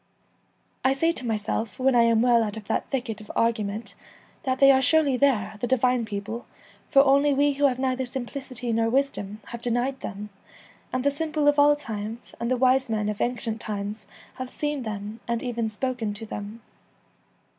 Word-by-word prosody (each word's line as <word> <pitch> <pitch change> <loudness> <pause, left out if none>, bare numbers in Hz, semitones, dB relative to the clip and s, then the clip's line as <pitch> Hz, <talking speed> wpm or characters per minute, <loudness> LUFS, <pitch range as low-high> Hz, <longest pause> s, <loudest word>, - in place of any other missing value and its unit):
I 265 - +4
say 330 +5 +2
to 255 -7 -6
myself, 215 -1 -2
when 265 +1 +3
I 240 - +5
am 230 -1 +4
well 240 -2 +5
out 215 -1 -2
of 220 - -7
that - - -2
thicket 240 -5 -3
of 210 - -13
argu 230 -1 +2
ment, 205 0 -5 0.5
that 260 -4 -1
they 275 0 +7
are 265 0 +4
surely 285 0 +3
there, 250 -6 +1
the 245 - -1
divine 250 -1 +2
people, 215 +3 -5 0.4
for 275 -1 +6
only 280 +1 +4
we 290 +1 +3
who 285 +1 +3
have 255 -2 -1
neither 260 -1 -1
simplicity 255 -1 -5
nor 225 0 +2
wisdom 225 -6 -1
have 235 -1 -7
denied 245 +3 -1
them, 210 0 -7 0.6
and 255 0 -1
the 285 - +3
simple 305 0 -1
of 290 0 +4
all 290 +1 +6
times 225 -4 -6
and 235 0 -2
the 255 - +2
wise 260 0 +3
men 215 -1 0
of 210 - -4
ancient 235 -3 -2
times 210 +1 -4 0.3
have 255 -1 -5
seen 295 0 -2
them 215 -1 -5
and 235 -1 -1
even 235 -3 -1
spoken 225 -2 -2
to 225 +2 -7
them. 215 +2 -7
245 Hz, 190 wpm, -25 LUFS, 220-270 Hz, 0.6 s, they